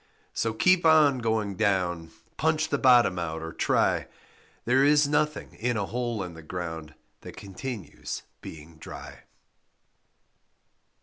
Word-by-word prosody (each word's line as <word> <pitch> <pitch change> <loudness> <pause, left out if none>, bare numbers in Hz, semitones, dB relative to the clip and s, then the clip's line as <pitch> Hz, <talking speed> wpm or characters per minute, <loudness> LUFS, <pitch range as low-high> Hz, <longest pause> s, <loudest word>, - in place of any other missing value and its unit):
So 115 - -1
keep 180 +10 +4
on 155 -5 +5
going 110 -4 -1
down, 90 -5 0 0.3
Punch 155 0 0
the 140 - 0
bottom 120 -8 +5
out, 80 -1 -4
or 80 0 -6
try, - - +1 0.6
There 130 +3 +3
is 145 0 +4
nothing 150 +1 -1
in 120 0 -2
a 100 - -1
hole 120 -2 -3
in 90 -2 -7
the 80 - -11
ground 80 -2 -6 0.2
That - - -11
continues 100 - -7 0.2
being 80 +1 -11
dry. - - -10
110 Hz, 130 wpm, -27 LUFS, 85-135 Hz, 0.6 s, on